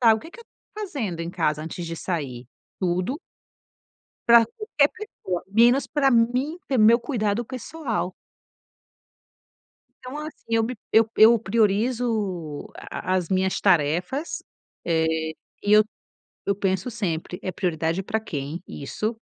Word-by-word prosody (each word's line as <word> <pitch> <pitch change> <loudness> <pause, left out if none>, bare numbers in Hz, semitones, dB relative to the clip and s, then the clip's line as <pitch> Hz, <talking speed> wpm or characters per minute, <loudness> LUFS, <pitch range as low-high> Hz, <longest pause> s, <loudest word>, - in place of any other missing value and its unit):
o 220 - -5
que 325 - -12
que - - -13
eu 465 - -12
estou 425 -2 -9
fazendo 225 - -4
em 165 - -4
casa 155 -4 0
antes 165 +2 -5
de 165 0 -4
sair? 135 -9 -4 0.3
Tudo 185 - 0 1.1
para 235 -1 +8
qualquer 295 - +1
pessoa, 190 - -5
menos 235 +6 +4
para 275 -3 +2
mim 250 +7 +2
ter 265 - +1
meu 230 +2 +6
cuidado 235 -3 -1
pessoal. 245 - -3 1.9
Então, 255 +4 -6
assim, 305 +1 -8
eu 225 0 +3
me 250 +3 -3 0.2
eu 225 0 +6
eu 230 +2 +8
priorizo 210 - 0
a 185 - -3
as 180 -3 -1
minhas 190 0 +1
tarefas, 180 - +1 0.4
eh, 160 -1 +2 0.6
e 205 - +1
eu 215 0 +8 0.6
eu 200 - +1
penso 190 +2 0
sempre: 180 -6 -3
"É 185 - -2
prioridade 170 -1 -1
para 220 +3 -2
quem 155 -3 -5
isso?" 215 - -4
215 Hz, 135 wpm, -24 LUFS, 175-245 Hz, 1.9 s, para